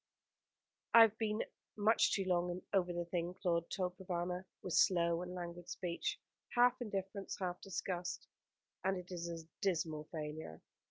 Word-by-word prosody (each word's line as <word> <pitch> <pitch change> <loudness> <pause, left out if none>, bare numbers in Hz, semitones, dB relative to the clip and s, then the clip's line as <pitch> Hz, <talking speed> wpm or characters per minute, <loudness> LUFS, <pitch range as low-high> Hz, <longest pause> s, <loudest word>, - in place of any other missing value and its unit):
"I 230 - +12
have 220 -2 +4
been 215 -1 +1 0.3
much 215 +2 +4
too 195 - +1
long 180 0 +1
over 180 -3 +3
the 175 0 -2
thing," 175 +1 -2
Claude 170 -3 0
told 180 -1 -2
Provana, 180 0 -2 0.2
with 180 - -3
slow 170 -2 +4
and 180 0 -5
languid 175 0 -6
speech, 175 -2 -2 0.4
half 245 +1 +5
indifference, 195 -3 -3
half 180 -2 -3
disgust; 180 -1 -3 0.6
"and 190 0 +2
it 180 0 -8
is 170 -1 -3
a 165 -1 -5 0.2
dismal 160 -5 0
failure. 150 - -5
180 Hz, 150 wpm, -37 LUFS, 170-195 Hz, 0.6 s, I